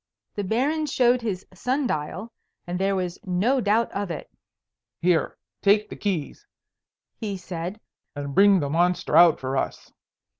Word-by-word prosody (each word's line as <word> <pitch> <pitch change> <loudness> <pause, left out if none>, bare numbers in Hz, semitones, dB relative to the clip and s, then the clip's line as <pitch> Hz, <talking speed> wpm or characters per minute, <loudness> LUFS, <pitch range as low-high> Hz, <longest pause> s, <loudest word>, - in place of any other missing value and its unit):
The 205 - -3
Baron 280 +10 0
showed 250 -2 +3
his 200 -5 -3
sun 260 +9 -1
dial, 185 +4 -3 0.3
and 175 +1 -3
there 195 0 +1
was 180 -2 -3
no 205 +9 +1
doubt 220 +2 +2
of 200 -1 -3
it. 165 - -6 0.7
"Here, 175 -2 +1 0.2
take 210 +1 +3
the - - -5
keys," 195 - -3 0.7
he 205 -4 -3
said, 180 +2 -6 0.4
"and 140 -1 -5
bring 200 +3 +6
the 140 - -2
monster 175 -1 +1
out 170 -1 +7
for 130 +1 -3
us." - - -3
195 Hz, 150 wpm, -25 LUFS, 175-225 Hz, 0.7 s, out